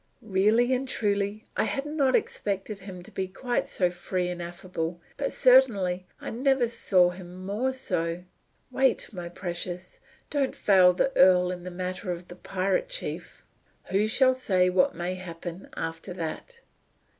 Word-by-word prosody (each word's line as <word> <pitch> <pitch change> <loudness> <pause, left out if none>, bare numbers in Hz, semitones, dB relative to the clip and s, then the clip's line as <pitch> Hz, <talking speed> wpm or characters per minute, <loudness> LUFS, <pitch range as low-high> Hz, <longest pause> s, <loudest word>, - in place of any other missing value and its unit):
Really 220 +5 +3
and 260 +1 -1
truly 205 -2 -1
I - - +2
had 275 - -2
not 290 -4 +2
expected 200 0 -2
him 185 -2 -9
to - - -12
be 190 - -2
quite 240 +6 -2
so 180 -2 +1
free 180 0 -2
and 175 -1 -5
affable, 170 -1 -4 0.2
but 280 - -2
certainly 205 -9 +4
I - - -6
never 265 +1 +2
saw 185 -6 +3
him 180 0 -10
more 220 +7 0
so. 170 -9 -2 0.5
Wait, 260 -2 +1
my 175 -2 -6
precious. 175 0 -5 0.3
Don't 280 -3 0
fail 185 -3 +6
the 230 +9 0
earl 180 -1 +6
in 180 -1 -5
the 180 - -6
matter 185 +2 -4
of 175 0 -6
the 175 - -9
pirate 190 - -1
chief. - - -6 0.5
Who 205 +3 +3
shall 260 +3 +4
say 185 -8 +2
what 180 0 +3
may 175 +2 -2
happen 175 0 -8
after 165 +3 -4
that?" 185 - -6
185 Hz, 155 wpm, -27 LUFS, 180-240 Hz, 0.5 s, fail